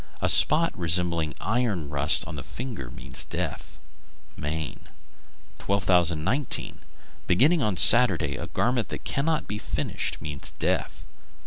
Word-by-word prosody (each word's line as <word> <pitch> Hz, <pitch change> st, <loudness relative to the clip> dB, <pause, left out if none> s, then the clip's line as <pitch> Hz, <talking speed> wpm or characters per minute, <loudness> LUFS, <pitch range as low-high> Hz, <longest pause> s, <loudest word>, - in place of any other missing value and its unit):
A -, -, 0 dB
spot 165 Hz, +3 st, +4 dB
resembling 85 Hz, -3 st, 0 dB
iron 110 Hz, -8 st, -1 dB
rust 70 Hz, +1 st, +3 dB
on 80 Hz, -, -7 dB
the 70 Hz, -, -6 dB
finger 115 Hz, -, -7 dB
means 65 Hz, +2 st, -2 dB
death. -, -, -6 dB, 0.6 s
Maine. 75 Hz, 0 st, -5 dB, 0.8 s
1219. 95 Hz, -, 0 dB, 0.5 s
Beginning 145 Hz, -, +3 dB
on 105 Hz, -7 st, -1 dB
Saturday 90 Hz, -, +6 dB
a 85 Hz, -, -6 dB
garment 120 Hz, +6 st, -1 dB
that -, -, -6 dB
cannot 155 Hz, +3 st, -2 dB
be 105 Hz, +1 st, -5 dB
finished -, -, -4 dB
means 75 Hz, -2 st, -4 dB
death. -, -, -2 dB
90 Hz, 120 wpm, -25 LUFS, 75-120 Hz, 0.8 s, Saturday